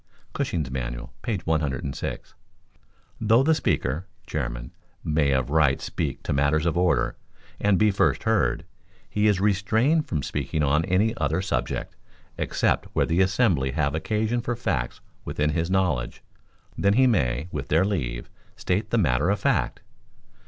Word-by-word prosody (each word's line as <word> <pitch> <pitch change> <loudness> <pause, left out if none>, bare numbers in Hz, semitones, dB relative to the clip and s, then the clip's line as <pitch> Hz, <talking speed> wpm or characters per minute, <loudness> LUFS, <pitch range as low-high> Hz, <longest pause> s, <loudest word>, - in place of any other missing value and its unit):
[Cushing's 75 -6 -2
Manual, - - -5
page 100 -7 -3
106.] 75 -3 -2 0.9
"Though 115 +4 +4
the 160 +3 +4
Speaker 80 - -1 0.2
[chairman] - - -4 0.3
may 75 -2 +1
of 65 -1 0
right 75 -4 +3
speak - - -4
to - - -1
matters 70 +3 +2
of 85 - +1
order 85 -9 +1 0.4
and 100 -2 +3
be 105 +1 +4
first - - +1
heard, - - +1 0.4
he 105 +1 +1
is 100 -3 +3
restrained 110 - +2
from 75 -4 -2
speaking 75 +2 -2
on 75 +3 +2
any 105 +5 +2
other 75 +3 0
subject 95 - -2 0.4
except - - 0
where - - +2
the 85 +3 +2
assembly 95 - +2
have 70 -3 0
occasion 110 +8 -1
for 120 +1 -2
facts 75 - -2 0.2
within 75 +1 -1
his 85 +2 -1
knowledge; 90 -11 0 0.5
then 100 0 +2
he 130 +4 +5
may, 70 - +1
with 70 -2 -4
their 80 +5 +3
leave, 65 -12 -2 0.3
state 100 +4 -1
the 115 - +1
matter 75 - +2
of 100 -1 +1
fact." - - 0
80 Hz, 150 wpm, -25 LUFS, 70-105 Hz, 0.9 s, he